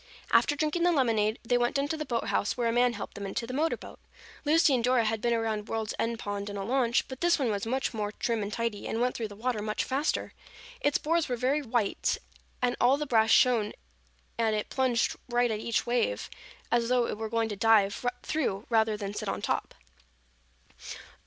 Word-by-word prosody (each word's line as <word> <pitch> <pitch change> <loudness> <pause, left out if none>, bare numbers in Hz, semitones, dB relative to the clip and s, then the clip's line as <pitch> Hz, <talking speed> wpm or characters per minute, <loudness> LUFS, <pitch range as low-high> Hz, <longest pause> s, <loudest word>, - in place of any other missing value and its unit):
After 290 - +4
drinking 310 +3 -1
the 350 +1 +4
lemonade 225 -7 +2
they 245 +1 +2
went 240 +2 0
down 280 0 +1
to 320 - 0
the 305 -1 -4
boat 235 -2 -1
house 205 - 0
where 240 -1 +1
a - - +2
man 245 0 +3
helped - - -6
them 200 -1 -6
into 215 +4 -3
the 255 - -6
motor 315 +4 +1
boat. - - -12 0.5
Lucy 315 0 +4
and 245 -3 +1
Dora 250 -2 +3
had 220 0 -1
been 240 - +1
around 225 -2 -1
World's 220 -1 -2
End 230 0 0
Pond 205 -1 -4
in 205 - -5
a 195 - -3
launch, 240 +1 +1
but 260 -1 -9
this 345 0 +4
one 260 -6 0
was 205 +1 -2
much 260 +2 -1
more 210 -2 -2
trim 230 +1 -1
and 205 0 -3
tidy 230 -2 -3
and 225 - -2
went 250 +1 +1
through 225 - -3
the 205 - -11
water 230 0 -2
much 215 0 -1
faster. 275 +4 -1 0.5
Its 290 - +2
boards 330 0 0
were 250 - 0
very 260 +5 +1
white 235 -5 0 0.5
and 245 -1 +2
all 255 +3 +5
the 300 - -2
brass 225 -4 +3
shone 230 -4 +4 0.7
and 220 -2 +2
it 210 - -3
plunged 255 -3 +1
right 240 -1 +2
at 215 - -2
each 225 +1 -1
wave 245 - -1 0.4
as 235 -1 +2
though 250 -1 +3
it - - -3
were 220 -1 -3
going 225 0 0
to 205 - -3
dive 210 -1 +3 0.2
through 230 -9 -1
rather 220 -1 +3
than 200 -1 -5
sit - - -4
on - - -2
top. - - -2
235 Hz, 220 wpm, -29 LUFS, 220-260 Hz, 0.7 s, all